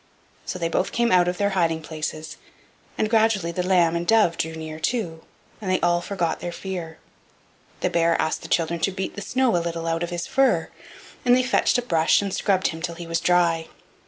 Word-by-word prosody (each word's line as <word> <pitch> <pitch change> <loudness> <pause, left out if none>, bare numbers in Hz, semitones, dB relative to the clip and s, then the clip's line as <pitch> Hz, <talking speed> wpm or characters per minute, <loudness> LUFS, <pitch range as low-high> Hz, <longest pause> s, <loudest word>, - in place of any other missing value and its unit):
So - - -3
they 170 -2 -1
both 165 - -1
came 235 0 +1
out 180 -1 +5
of 180 0 -1
their 200 0 +1
hiding 165 -4 0
places, 155 0 -5 0.6
and 215 - +1
gradually 215 -6 +2
the 180 - -2
lamb 180 -2 +3
and 170 0 -2
dove 215 -7 +4
drew 160 0 -3
near 155 -1 -7
too, 165 -4 -2 0.4
and 195 - -4
they 185 - +2
all 175 0 +2
forgot 175 -3 -2
their 175 - -4
fear. 175 -3 -6 0.8
The - - +1
bear 170 0 +2
asked 160 - -1
the - - -8
children 170 0 0
to 195 - +1
beat 190 0 -4
the 205 - -6
snow 255 +2 +1
a 170 - +2
little 165 -1 -4
out 165 0 -1
of 175 - -2
his 175 -1 -3
fur, 270 0 +2 0.5
and 245 0 +5
they 255 - +2
fetched 250 - +2
a 245 - -1
brush 165 -7 +3
and 200 -2 -3
scrubbed 190 -2 +1
him 160 0 -7
till 170 0 -4
he 170 0 -8
was 165 0 -1
dry. 170 -2 +2
175 Hz, 215 wpm, -24 LUFS, 165-195 Hz, 0.8 s, out